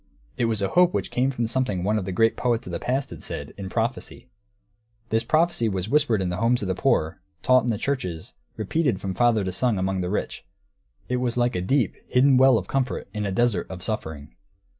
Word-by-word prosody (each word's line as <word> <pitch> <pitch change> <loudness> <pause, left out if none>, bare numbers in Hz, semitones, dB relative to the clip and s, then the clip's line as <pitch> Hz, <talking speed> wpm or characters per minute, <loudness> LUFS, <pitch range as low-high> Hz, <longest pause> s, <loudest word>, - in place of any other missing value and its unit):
It 120 - 0
was 110 -3 0
a 95 - 0
hope 180 0 +4
which - - -2
came 130 +2 +1
from 120 -3 -2
something 110 -6 -1
one 105 +3 +1
of 95 - -5
the 95 - -3
great 115 +4 +2
poets 120 -1 0
of - - -7
the - - -2
past 135 +2 -2
had - - -9
said, - - -6
in 95 -1 -7
prophecy. 120 +3 -3 0.8
This 115 0 +1
prophecy 160 -8 +2
was 95 0 -3
whispered 120 -8 +2
in 90 - -1
the 90 - -3
homes 115 +2 +1
of - - -2
the 95 - 0
poor, 80 -2 0 0.2
taught 130 0 +5
in - - 0
the 110 - 0
churches, 95 - -3 0.2
repeated 120 - 0
from 95 -1 -4
father 110 +1 +2
to 95 - -2
son 110 +3 0
among 95 0 -1
the 90 - -2
rich; 105 - -3 0.6
it 125 - -1
was 125 -1 -1
like 120 0 +1
a 90 - -1
deep, 120 +3 +1
hidden 135 +2 +4
well 130 -2 +6
of - - -4
comfort 130 -2 -2
in 105 -2 -2
a - - -2
desert 110 -2 +1
of 90 -1 -8
suffering. 80 - -4
115 Hz, 225 wpm, -24 LUFS, 95-125 Hz, 0.8 s, well